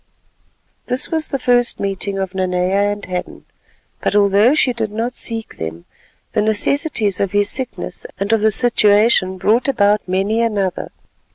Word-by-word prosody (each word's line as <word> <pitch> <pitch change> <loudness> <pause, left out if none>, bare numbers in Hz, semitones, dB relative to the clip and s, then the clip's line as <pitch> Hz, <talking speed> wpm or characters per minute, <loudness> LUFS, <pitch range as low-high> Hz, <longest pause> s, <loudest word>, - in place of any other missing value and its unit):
This 250 +3 +1
was 320 -1 -2
the 275 - -2
first 245 -1 +1
meeting 195 0 -2
of 190 -1 -3
Nanea 185 +2 0
and 205 0 -6
Hadden; 180 -1 -6 0.6
but, - - -1
although 205 +6 +4
she 260 -5 +2
did 220 -3 -3
not 230 +4 -3
seek 225 -2 -5
them, 80 +1 -6 0.5
the - - +1
necessities 220 - 0
of 195 -1 -1
his 205 0 +2
sickness 260 -2 -5
and 200 +3 0
of 225 - +2
the 220 - +4
situation 210 -4 +3
brought 215 +8 +2
about 210 -5 +2
many 195 +5 0
another. 205 -5 -1
205 Hz, 155 wpm, -18 LUFS, 195-235 Hz, 0.6 s, although